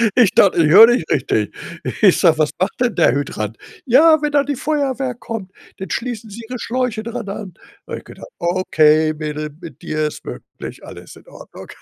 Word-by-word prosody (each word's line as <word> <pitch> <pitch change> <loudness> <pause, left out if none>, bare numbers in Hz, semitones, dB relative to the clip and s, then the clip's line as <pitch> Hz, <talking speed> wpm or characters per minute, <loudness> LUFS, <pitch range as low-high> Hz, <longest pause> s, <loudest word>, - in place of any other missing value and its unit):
ich 240 -7 +5
dachte, 195 -3 +4
ich 150 - +2
höre 220 +5 +10
nicht 240 -10 0
richtig. 110 -6 -1 0.5
Ich 195 -4 +5
sage: 165 -3 +4
„Was 150 -1 +2
macht 190 +2 0
denn 245 -3 +1
der - - +3
Hydrant?“ 115 -6 -4 0.3
„Ja, 310 +5 +5
wenn 300 -1 -1
dann 285 -1 +2
die 285 - -1
Feuerwehr 270 -3 -2
kommt, 220 -5 -7 0.3
dann 190 - -7
schließen 235 -2 -4
sie 230 +3 -9
Ihre 250 - -4
Schläuche 240 -3 -2
dran 230 -3 -6
an.“ 195 -3 -7 0.3
Habe - - -5
ich - - -19
gedacht: - - -12
„Okay, 155 -3 +2
Mädel, 150 0 -5
mit 160 -7 -11
dir 155 0 -2
ist - - -9
wirklich, - - -9
alles - - -12
in - - -18
Ordnung.“ - - -13
195 Hz, 195 wpm, -18 LUFS, 155-245 Hz, 0.5 s, höre